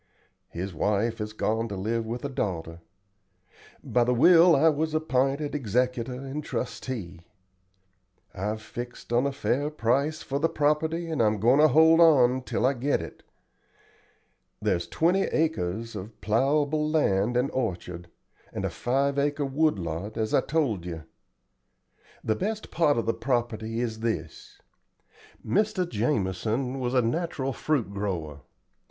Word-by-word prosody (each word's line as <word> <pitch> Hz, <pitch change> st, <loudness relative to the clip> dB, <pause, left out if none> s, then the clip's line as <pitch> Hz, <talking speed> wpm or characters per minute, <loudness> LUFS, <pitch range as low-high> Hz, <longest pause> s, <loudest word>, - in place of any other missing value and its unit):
His 90 Hz, +2 st, -5 dB
wife 105 Hz, +7 st, 0 dB
has 105 Hz, 0 st, -4 dB
gone 110 Hz, +1 st, -1 dB
to 100 Hz, -, -5 dB
live 110 Hz, +4 st, -2 dB
with 120 Hz, +4 st, -4 dB
a -, -, -2 dB
daughter. 85 Hz, -9 st, -3 dB, 1.0 s
By 120 Hz, -, +2 dB
the 125 Hz, +1 st, +1 dB
will 170 Hz, +6 st, +7 dB
I 150 Hz, +4 st, +4 dB
was 155 Hz, 0 st, +1 dB
app'inted 140 Hz, -1 st, 0 dB
executor 125 Hz, -1 st, -1 dB
and 135 Hz, +3 st, -6 dB
trustee. 105 Hz, -11 st, -5 dB, 1.1 s
I've 105 Hz, +3 st, -3 dB
fixed 120 Hz, 0 st, -7 dB
on 125 Hz, +4 st, +3 dB
a -, -, -1 dB
fair 140 Hz, +1 st, -1 dB
price 140 Hz, +3 st, 0 dB
for 140 Hz, +1 st, -2 dB
the 165 Hz, +3 st, +2 dB
property, 155 Hz, +3 st, 0 dB
and 160 Hz, -6 st, -1 dB
I'm 105 Hz, -1 st, +2 dB
goin' 120 Hz, +7 st, +4 dB
to 155 Hz, -, +7 dB
hold 160 Hz, +3 st, +5 dB
on 130 Hz, -6 st, +5 dB
till 125 Hz, -, -1 dB
I 135 Hz, -, +3 dB
get 135 Hz, +3 st, 0 dB
it. 80 Hz, -, -9 dB, 1.4 s
There's 85 Hz, -1 st, 0 dB
twenty 180 Hz, +4 st, +2 dB
acres 115 Hz, -, -1 dB
of 105 Hz, +2 st, -8 dB
plowable 145 Hz, +7 st, +1 dB
land 120 Hz, -6 st, +2 dB
and 125 Hz, +3 st, +1 dB
orchard, 90 Hz, -7 st, -4 dB, 0.4 s
and -, -, -4 dB
a -, -, -2 dB
five 140 Hz, +3 st, 0 dB
acre 145 Hz, 0 st, 0 dB
wood 150 Hz, 0 st, +1 dB
lot, 85 Hz, +4 st, -5 dB
as 110 Hz, -1 st, -1 dB
I -, -, +5 dB
told 135 Hz, -, -1 dB
you. 85 Hz, -3 st, -6 dB, 1.2 s
The 110 Hz, -, 0 dB
best 215 Hz, -, -4 dB
part 150 Hz, -6 st, +2 dB
of 115 Hz, -, 0 dB
the 115 Hz, -, +1 dB
property 115 Hz, -3 st, -2 dB
is 110 Hz, -2 st, -3 dB
this. 100 Hz, -9 st, -4 dB, 0.9 s
Mr. 205 Hz, -3 st, +1 dB
Jamison 115 Hz, -, -1 dB
was 125 Hz, 0 st, -2 dB
a 125 Hz, -, +4 dB
natural 135 Hz, +1 st, -2 dB
fruit 125 Hz, -7 st, -1 dB
grower. 85 Hz, -8 st, -4 dB
125 Hz, 145 wpm, -27 LUFS, 110-150 Hz, 1.4 s, will